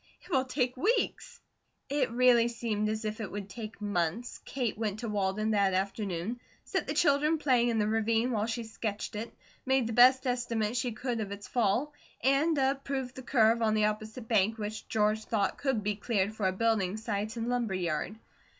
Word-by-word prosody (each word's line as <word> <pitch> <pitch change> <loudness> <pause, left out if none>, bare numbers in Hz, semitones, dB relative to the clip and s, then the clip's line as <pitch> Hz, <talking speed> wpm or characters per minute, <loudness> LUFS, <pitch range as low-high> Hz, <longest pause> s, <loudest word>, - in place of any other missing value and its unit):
It - - -15
will 265 -4 +2
take 255 -1 -1
weeks." 415 - 0 0.5
It 275 -3 0
really 240 -1 +5
seemed 225 -3 -1
as 220 0 -3
if 215 +1 -3
it 205 - -5
would 200 -1 -5
take 215 +2 -8
months. 205 +3 -2
Kate 250 -5 -2
went 215 -1 -3
to 235 - -3
Walden 210 +1 0
that 200 -3 +2
afternoon, 195 +2 -2 0.2
set - - -2
the - - -2
children 300 +1 +3
playing 250 -5 +3
in 230 - 0
the 210 - +2
ravine 225 +2 +1
while 215 -2 0
she 235 +1 -3
sketched 220 -2 -4
it, 225 +3 -5 0.3
made 265 -2 +2
the 230 - -3
best 255 +3 +6
estimate 240 -3 -1
she 245 0 0
could 240 +1 -3
of 205 -2 -4
its 200 0 -7
fall, 245 +6 +1 0.3
and 285 +4 +3
approved 270 -1 -1
the 260 - -8
curve 230 -3 +3
on 215 -1 +2
the 215 -1 +3
opposite 215 +2 -3
bank 220 0 +2
which 215 0 -5
George 215 0 +1
thought 205 -4 0
could 265 -7 0
be 210 0 0
cleared 205 -1 0
for 210 -3 0
a - - +2
building 210 -1 +1
site 215 +1 -3
and 230 0 -2
lumber 240 -5 0
yard. 175 +3 -2
225 Hz, 195 wpm, -30 LUFS, 210-250 Hz, 0.5 s, best